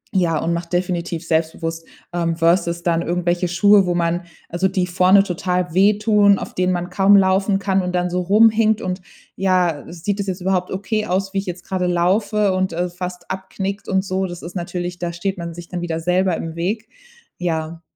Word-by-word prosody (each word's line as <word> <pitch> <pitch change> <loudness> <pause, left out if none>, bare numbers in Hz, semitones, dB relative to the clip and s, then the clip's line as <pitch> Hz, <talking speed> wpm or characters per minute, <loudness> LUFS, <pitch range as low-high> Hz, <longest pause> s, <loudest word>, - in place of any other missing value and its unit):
ja, 170 -4 +2
und 170 +2 -1
macht 170 +1 -5
definitiv 175 -1 -2
selbstbewusst, 165 0 -2 0.3
ähm, 170 -1 0
versus 170 0 +2
dann 170 -1 +1
irgendwelche 175 +1 0
Schuhe, 195 +2 +4
wo 175 - 0
man 170 0 0 0.3
also 175 +3 0
die 185 -1 0
vorne 185 +2 +4
total 180 -2 -2
wehtun, 205 +1 +4
auf - - -7
denen 180 0 +1
man 175 0 -3
kaum 195 +2 +5
laufen 195 +1 +3
kann 195 -1 +1
und 180 0 -3
dann 180 0 0
so 180 +1 0
rumhinkt, 220 +3 +4
und: 185 0 -3 0.3
„Ja, 180 -6 +1
sieht 180 +4 -3
das 200 - -2
jetzt 185 0 -3
überhaupt 180 -1 0
okay 210 +3 -2
aus, 195 +2 -1
wie 195 - +1
ich 195 - -6
jetzt 180 0 -5
gerade 185 -1 -1
laufe?“ 195 +3 +1
und, 185 -1 0
äh, 175 +2 -1
fast 180 0 -7
abknickt 190 +1 -5
und 190 0 +1
so. 190 0 -1
Das 175 -1 -9
ist 175 - -8
natürlich 175 0 -4
da 175 -1 -3
steht 190 +2 -3
man 170 -1 -6
sich 175 0 -9
dann 180 -1 -5
wieder 165 -2 -2
selber 180 +1 +1
im 165 0 -6
Weg. 205 +7 -3 0.5
Ja. 165 -1 -3
180 Hz, 195 wpm, -20 LUFS, 175-195 Hz, 0.5 s, kaum